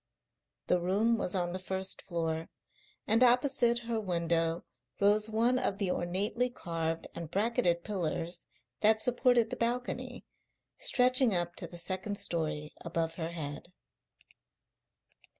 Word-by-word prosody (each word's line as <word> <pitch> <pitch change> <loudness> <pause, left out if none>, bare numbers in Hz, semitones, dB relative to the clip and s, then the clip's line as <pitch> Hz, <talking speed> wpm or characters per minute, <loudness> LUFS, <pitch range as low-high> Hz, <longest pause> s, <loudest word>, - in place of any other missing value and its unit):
The 180 - +2
room 200 +6 +2
was 180 - -2
on 175 -1 0
the 185 - -3
first 190 0 -3
floor, 165 -2 -2 0.6
and 225 +4 +4
opposite 245 -1 +4
her 230 -1 -1
window 170 -3 0 0.3
rose 210 +2 +3
one 235 +3 +2
of 195 - -1
the 195 -3 0
ornately 200 +9 0
carved 165 -7 -3
and 170 -2 -6
bracketed 190 -5 +1
pillars 175 -3 -3 0.3
that 220 +1 +4
supported 245 -1 +3
the - - -3
balcony, 245 +1 -2 0.5
stretching 250 -3 +4
up 175 -1 -1
to - - -1
the 175 - -10
second 185 +4 -2
story 160 -6 -2
above 165 -1 -2
her 165 -1 -4
head. 155 0 -6
185 Hz, 130 wpm, -31 LUFS, 170-230 Hz, 0.6 s, and